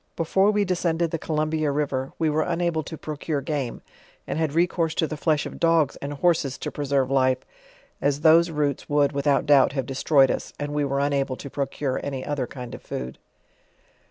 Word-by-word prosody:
Before 190 +5 +2
we 210 -1 +2
descended 170 -2 0
the 165 - -2
Co'urnbia 155 0 -1
river, 140 -2 -2
we 160 - +1
were 155 +1 +1
unable 170 -1 0
to 155 +2 -8
procure 150 0 -3
game, 140 -3 -3 0.4
and - - -3
had 155 -3 0
recourse 165 -1 +1
to - - +2
the 155 - -4
flesh 150 -1 +1
of - - -8
dogs 165 -4 +3
arid 140 0 -6
horses 160 -7 +2
to - - -5
preserve 140 -2 0
life, 130 -1 +3 0.6
as 145 0 +1
those 165 +2 +6
roots 150 -3 -2
would, 145 -1 +3
without 140 0 +1
doubt, 140 -2 +5
have 135 -3 -2
destroyed 135 +1 +3
us, - - -4
and 145 0 -3
we 150 0 0
were 140 0 0
unable 140 -2 0
to 140 +1 -9
procure 135 -1 -2
any 135 -2 -4
other 145 -4 -2
kind 125 -3 -8
of - - -8
food. 65 0 -6
145 Hz, 190 wpm, -24 LUFS, 140-160 Hz, 0.6 s, those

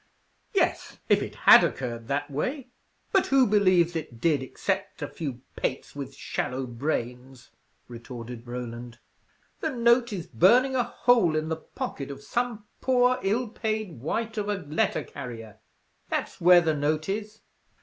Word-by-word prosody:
"Yes, - - 0
if - - +4
it - - -5
had - - +8
occurred 115 -3 -3
that 140 +2 -2
way; 250 - -3 0.4
but 385 -3 +3
who 270 -1 +5
believes 185 -5 +3
it 150 -8 -5
did, 150 0 +2
except 130 - -3
a - - -2
few 135 -7 -6
pates 130 - -3
with 140 -1 -6
shallow 130 -1 -3
brains?" 125 0 -4 0.4
retorted 120 0 -9
Roland. 120 -1 -6 0.6
"The 315 - -1
note 235 -2 +3
is 180 -5 -4
burning 245 - +4
a 250 - +3
hole 235 -9 +3
in 155 0 -1
the 160 - 0
pocket 140 -3 -6
of 140 0 -8
some 240 -3 -2 0.2
poor, 255 -1 +3
ill 225 +6 0
paid 215 - -3
wight 225 - -2
of 205 0 -2
a 205 - +1
letter 155 -4 -1
carrier; 115 -6 -9 0.5
that's - - -3
where 175 0 +8
the 160 -2 +1
note 150 +1 0
is. 210 +2 -4
160 Hz, 150 wpm, -27 LUFS, -, 0.6 s, had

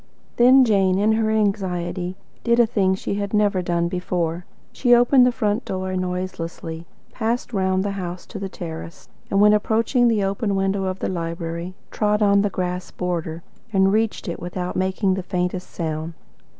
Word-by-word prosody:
Then 255 +2 +7
Jane, 195 -4 +3
in 210 +2 +3
her 220 0 +1
anxiety, 185 -4 -1 0.3
did 235 0 +3
a 240 - +7
thing 195 -4 +1
she 190 - -4
had 200 +1 -2
never 205 -3 +2
done 170 -1 0
before. 175 -1 -2 0.3
She 245 -2 +4
opened 245 +1 +5
the - - +3
front 215 -1 -1
door 185 0 -3
noiselessly, 180 -3 -4 0.2
passed 235 +1 -2
round 190 -1 +1
the 200 - -1
house 180 -2 -5
to 205 - -8
the 195 0 -4
terrace, 165 -2 -8 0.2
and 195 - +2
when 210 +1 +6
approaching 230 +4 +2
the 220 -3 +2
open 200 +1 -1
window 195 0 0
of 185 0 -2
the - - -3
library, 170 0 -4 0.2
trod 210 0 +1
on 200 -1 +4
the 205 - +1
grass 180 -1 -3
border, 170 -2 -3 0.3
and 195 -1 +3
reached 220 -1 0
it 170 - -4
without 180 +1 -4
making 190 +1 +1
the 190 - -2
faintest 180 0 -3
sound. 160 0 -4
190 Hz, 175 wpm, -22 LUFS, 180-210 Hz, 0.3 s, Then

